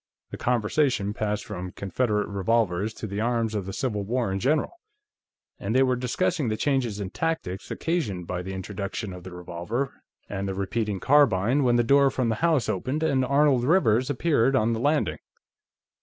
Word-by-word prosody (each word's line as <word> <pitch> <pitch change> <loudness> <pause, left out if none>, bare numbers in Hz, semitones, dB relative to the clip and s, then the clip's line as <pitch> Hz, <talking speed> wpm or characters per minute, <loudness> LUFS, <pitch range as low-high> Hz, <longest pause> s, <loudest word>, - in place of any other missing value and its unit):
The - - -6
conversation 120 -2 +1
passed 105 -1 -2
from 90 -3 -6
Confederate 105 +2 -1
revolvers 100 0 0
to - - -6
the 100 0 -3
arms 115 -1 0
of 100 -3 -3
the - - -3
Civil 105 -3 -2
War 120 0 -1
in 95 - -1
general, 145 +8 +1 0.9
and 105 +4 -2
they 130 - +6
were 130 -1 +2
discussing 130 +4 0
the 110 - -1
changes 125 -7 0
in 100 -2 -4
tactics 105 - -3
occasioned 115 - -2
by 90 +1 -3
the 95 +1 -6
introduction 100 +1 -5
of 90 -1 -10
the 95 - -9
revolver 90 +9 -4 0.3
and 100 -1 -3
the 95 - -3
repeating 100 +1 -2
carbine 130 -2 +4
when 120 -2 +3
the 120 - +4
door 140 +3 +5
from 130 -3 -1
the 110 - +1
house 160 -8 +2
opened 130 - -2
and 140 -5 +2
Arnold 140 -1 +3
Rivers 130 - +3
appeared 140 -3 +2
on 110 0 +2
the 110 - -2
landing. 130 - +1
115 Hz, 180 wpm, -26 LUFS, 100-135 Hz, 0.9 s, they